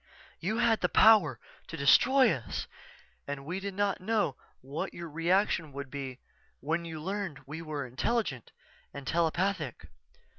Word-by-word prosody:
You 215 +6 -1
had 235 -2 +3
the - - +2
power 185 - +6 0.3
to 165 - -7
destroy 255 - +5
us 120 -4 -4 0.6
and 140 -1 -5
we 180 +5 -3
did 195 0 -5
not 200 -1 0
know 205 -8 +1 0.3
what 140 +4 -5
your 170 -1 -6
reaction 165 0 +1
would 140 -1 -7
be 135 -3 -5 0.4
when 165 +4 -1
you 160 -2 -6
learned 190 -4 -4
we 150 +4 -7
were 150 -4 -4
intelligent 130 - -2 0.4
and 140 -1 -7
telepathic. 170 - 0
165 Hz, 145 wpm, -30 LUFS, 140-200 Hz, 0.6 s, power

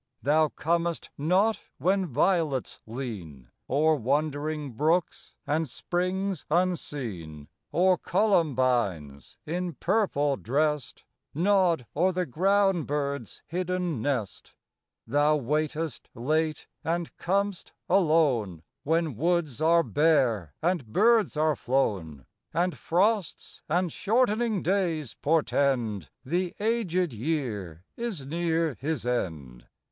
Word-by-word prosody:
Thou 155 +4 +4
comest 170 +3 -1
not 185 +9 +2 0.2
when 185 +5 +1
violets 155 -2 0
lean 100 - -7 0.2
O'er 155 +4 +3
wandering 145 +2 -1
brooks 160 +8 0
and 155 +1 0
springs 185 +4 -2
unseen, 125 - -2 0.2
Or 180 0 +3
columbines, 125 - 0
in 175 +2 -3
purple 145 - +1
dressed, 150 +2 -1 0.3
Nod 175 -5 +3
o'er 180 +5 +3
the 180 0 -1
ground 195 +3 +2
bird's 140 -5 -3
hidden 180 -5 -2
nest. 120 -8 -3 0.5
Thou 145 +2 +3
waitest 150 +2 -2
late 155 +6 0 0.2
and 165 +1 -2
com'st 200 +1 -1 0.2
alone, 140 - +2 0.2
When 160 -2 0
woods 155 -1 0
are 165 +1 +5
bare 130 - +2
and 170 -7 0
birds 215 - +3
are 155 0 +2
flown, 95 - -1 0.3
And 175 +1 +1
frosts 195 +1 0
and 175 +2 +1
shortening 220 -2 +1
days 170 - 0
portend 135 - 0 0.2
The 175 +5 -1
aged 190 - 0
year 110 - -3
is 225 - -4
near 165 0 0
his 145 -3 -2
end. 80 - -3
155 Hz, 100 wpm, -27 LUFS, 130-180 Hz, 0.5 s, are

